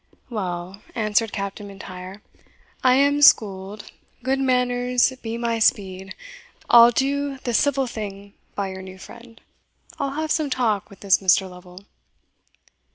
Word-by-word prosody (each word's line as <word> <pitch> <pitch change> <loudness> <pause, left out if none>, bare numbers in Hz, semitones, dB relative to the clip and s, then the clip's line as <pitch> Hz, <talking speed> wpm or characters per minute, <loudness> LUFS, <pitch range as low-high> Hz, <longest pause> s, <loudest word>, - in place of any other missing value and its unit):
"Well," 185 -2 -5
answered 220 -1 +1
Captain 200 +1 -5
M'Intyre, 190 0 -10 0.6
"I 255 -1 +5
am 285 +2 +3
schooled 205 -5 +3 0.3
good 265 +1 0
manners 250 -1 +1
be 225 0 -4
my 235 -1 -1
speed! 190 -3 0 0.6
I'll 235 0 +9
do 275 +3 -1
the 240 - -2
civil 275 +3 +2
thing 200 -4 -7 0.2
by 200 -1 -2
your 190 0 -7
new 190 0 -10
friend 230 +3 -14 0.6
I'll 275 -1 -2
have 310 +1 -3
some 310 -4 +1
talk 225 -6 0
with 200 - -16
this 195 -2 +3
Mr. 190 0 +3
Lovel." 180 +1 -13
220 Hz, 135 wpm, -23 LUFS, 195-255 Hz, 0.6 s, I'll